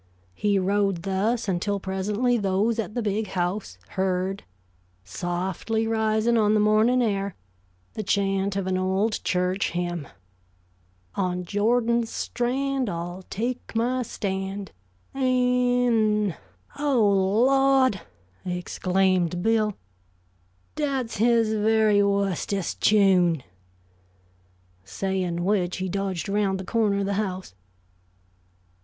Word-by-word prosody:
He 205 - +1
rode 195 -2 0
thus 210 +5 0
until 200 +2 -1
presently 205 +6 0
those 210 +2 +1
at 210 -1 -4
the 240 - -1
Big 210 +1 -1
House 180 - -3
heard, 190 +1 -1 0.6
softly 180 - -2
rising 220 +1 +1
on 215 0 +3
the - - +3
morning 215 +4 +3
air, 200 -3 -1 0.6
the - - -4
chant 195 -1 0
of 195 -2 -1
an 185 0 0
old 190 +4 0
church 180 +1 0
hymn: 175 -4 -3 1.1
"On 180 -2 -2
Jordan's 230 +4 +1
strand 260 +1 -1
I'll 175 +1 -5
take 240 +3 -4
my 245 +3 +1
stand, 195 -3 -4 0.4
An 270 - -5
n 245 -4 +2
n - - -13 0.2
" 285 - -22
"Oh, 210 -7 +3
Lawd," 270 -6 +3 0.4
exclaimed 180 0 0
Bill. 220 -2 +2 1.0
"Dat's 270 -7 -2
his 230 0 +3
very 215 -1 +3
wustest 200 -1 -1
chune!" 185 -7 +4 1.4
saying 175 - -2
which 185 -3 0
he 190 +1 -2
dodged 195 -1 -3
around 200 -1 0
the 190 - -7
corner 210 -2 +1
of - - -1
the 200 - -1
house. 185 - -5
200 Hz, 110 wpm, -25 LUFS, 190-225 Hz, 1.4 s, chune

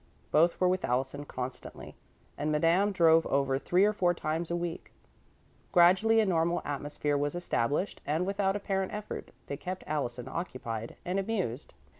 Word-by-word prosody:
Both 165 +3 +4
were 185 - +4
with 185 0 +1
Allison 135 +4 -1
constantly, 125 -2 -7 0.4
and 150 +1 -2
Madame 170 +7 +3
drove 165 -3 +4
over 135 -1 +1
three 180 +6 +3
or 210 - +2
four 175 -4 +2
times 160 +1 -2
a 170 - 0
week. 175 -1 -4 0.8
Gradually 190 +6 +5
a 220 - +4
normal 170 -2 +1
atmosphere 145 0 -2
was 145 +3 -1
established, 160 - -1
and, 155 +5 0
without 195 0 0
apparent 195 -2 -2
effort, 210 0 -6 0.2
they 140 - -5
kept 185 +4 -5
Allison 125 -5 -2
occupied 115 -9 -5
and 185 +2 0
amused. 190 - -3
170 Hz, 155 wpm, -30 LUFS, 145-185 Hz, 0.8 s, Gradually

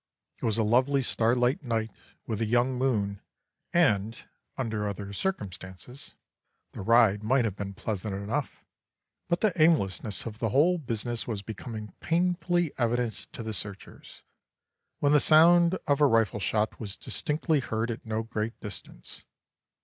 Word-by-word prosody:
It - - -2
was 110 -1 +2
a 115 - +2
lovely 130 +5 +3
starlight 125 +7 +2
night 115 -4 -2 0.3
with 110 -1 -3
a 110 - +1
young 120 +3 +2
moon, 105 -6 0 0.5
and, 115 - +2 0.4
under 110 -5 -2
other 100 0 -5
circumstances, 100 - -4 0.6
the - - -8
ride 110 -1 +4
might 125 +3 +2
have 105 -4 -2
been 100 -1 -6
pleasant 100 -1 -3
enough; 110 +9 -4 0.6
but 170 - 0
the 215 -4 +3
aimlessness 105 - +2
of 110 -2 -7
the 115 - 0
whole 165 - +3
business 120 -3 -3
was 105 -4 -3
becoming 110 -1 -7
painfully 175 -1 +1
evident 120 -1 +1 0.2
to 115 - -6
the 110 0 -4
searchers, 100 0 -7 0.7
when 145 - +2
the 150 - +7
sound 170 +4 +6
of 145 0 +1
a 145 - +7
rifle 115 -4 +2
shot 105 +2 0
was 100 -4 -5
distinctly 155 - 0
heard 115 -2 -2
at 115 - -6
no 110 0 -2
great 110 0 -4
distance. 105 - -9
115 Hz, 150 wpm, -28 LUFS, 105-140 Hz, 0.7 s, the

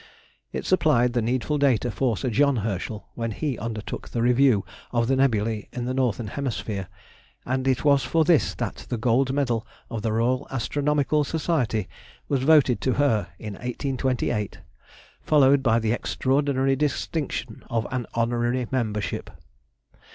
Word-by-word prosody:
It - - -4
supplied 125 -10 +3
the 120 - +1
needful 130 +6 0
data 125 -4 +2
for 120 -2 0
Sir 130 - -2
John 140 +4 +3
Herschel 105 +1 -4
when 115 -1 -3
he 130 +3 -3
undertook 110 -1 -5
the 115 - -1
review 125 -4 +4 0.3
of 120 -1 +1
the 135 - +2
nebulæ 115 -5 +1
of 120 - -2
the 130 - -2
northern 125 -3 0
hemisphere; 110 -7 -3 0.6
and 130 +1 -1
it 130 +2 +1
was 140 -2 +5
for 165 -1 +2
this 160 -2 +3
that - - -5
the 120 - -1
Gold 125 +4 +2
Medal 125 -5 0 0.3
of 115 -2 -3
the 110 - -1
Royal 120 +4 +1
Astronomical 145 +3 +1
Society 140 - -1 0.4
was 140 -3 0
voted 135 -5 +4
to 130 - +1
her 115 -7 +2
in 105 -2 -6
1828, 125 -2 -2 0.6
followed 140 -2 +4
by 115 -4 +3
the 110 -2 0
extraordinary 135 +2 +1
distinction 140 -3 -2
of 115 -1 0
an 125 -3 -2
Honorary 120 +2 0
Membership. 110 -5 -2
125 Hz, 150 wpm, -25 LUFS, 115-140 Hz, 0.6 s, was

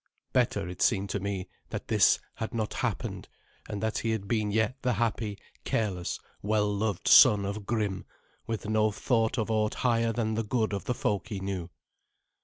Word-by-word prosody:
Better, - - +1
it 90 - -7
seemed 100 -3 +2
to 100 - -1
me, 100 -1 -3 0.2
that - - -5
this - - +5 0.2
had 110 - -5
not 110 -2 -1
happened, - - -3 0.4
and 105 0 -4
that 110 0 0
he 115 - -2
had 110 -3 -2
been 110 -2 0
yet 110 +5 0
the 125 -1 +1
happy, 110 -1 -1 0.3
careless, 95 -6 -1 0.2
well 105 0 +1
loved 105 -2 -1
son 100 -2 +8
of 100 0 -5
Grim, 105 -4 -1 0.4
with 110 -2 -3
no 110 0 +3
thought 115 +2 0
of 110 -1 -1
aught 110 -1 +1
higher 115 -1 +3
than 110 -1 -1
the 115 +1 0
good 110 -1 0
of 100 - -3
the 125 - -1
folk 105 -2 -1
he 105 -3 -4
knew. 95 -3 -4
110 Hz, 185 wpm, -29 LUFS, 100-115 Hz, 0.4 s, son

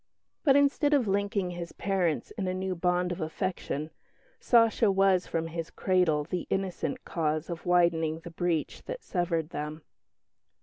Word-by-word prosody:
But, 275 -4 +5
instead 285 +1 +4
of 255 -6 +2
linking 200 -1 0
his 175 -1 -6
parents 185 -6 -1
in 195 -4 -3
a 185 - -1
new 190 0 -2
bond 180 0 0
of 175 - -4
affection 155 -2 -3 0.5
"Sacha" 230 -2 +4
was 195 -1 +3
from 165 0 -1
his 165 0 -4
cradle 180 -6 +2
the 175 +3 -4
innocent 190 -6 -2
cause 155 0 -1
of 170 +1 -6
widening 165 -2 +2
the 170 - -9
breach 165 -2 -1
that - - -6
severed 170 -4 -1
them. 150 +1 -5
180 Hz, 150 wpm, -29 LUFS, 165-195 Hz, 0.5 s, But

